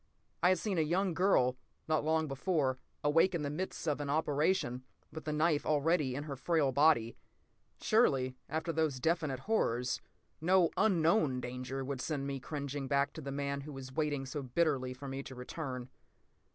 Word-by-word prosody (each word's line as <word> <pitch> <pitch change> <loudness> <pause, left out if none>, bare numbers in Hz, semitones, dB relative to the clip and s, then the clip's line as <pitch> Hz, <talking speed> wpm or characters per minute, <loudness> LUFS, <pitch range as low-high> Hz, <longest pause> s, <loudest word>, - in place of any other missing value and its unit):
I 180 - +5
had 185 - +4
seen 195 -2 -1
a - - +4
young 175 +4 +1
girl, 145 -9 +3 0.3
not 155 -2 +1
long 160 0 +1
before, 135 -2 0 0.2
awake 165 +5 +4
in 160 - -1
the 145 - -2
midst 175 +1 -4
of 150 -1 0
an 145 - -3
operation, 145 -3 +1 0.3
with 160 - -8
the 155 - -1
knife 150 0 +2
already 150 -3 +1
in 145 - -3
her 145 -2 -5
frail 145 0 +1
body. 135 -5 +3 0.6
Surely, 135 - +2
after 160 +2 -2
those 155 -4 0
definite 155 -3 0
horrors, 125 - 0 0.4
no 180 +1 +4
unknown 165 -8 +3
danger 130 +2 -4
would 135 -2 -3
send 145 -2 -2
me 140 -1 -3
cringing 140 0 -4
back 140 0 +1
to 160 - -7
the 140 -1 -5
man 140 0 -2
who 150 +1 -8
was 130 -1 -8
waiting 145 -2 -1
so 140 +2 -4
bitterly 135 -1 0
for 140 +2 -8
me 135 0 -4
to 130 -1 -9
return. 125 -1 -5
145 Hz, 180 wpm, -33 LUFS, 135-160 Hz, 0.6 s, I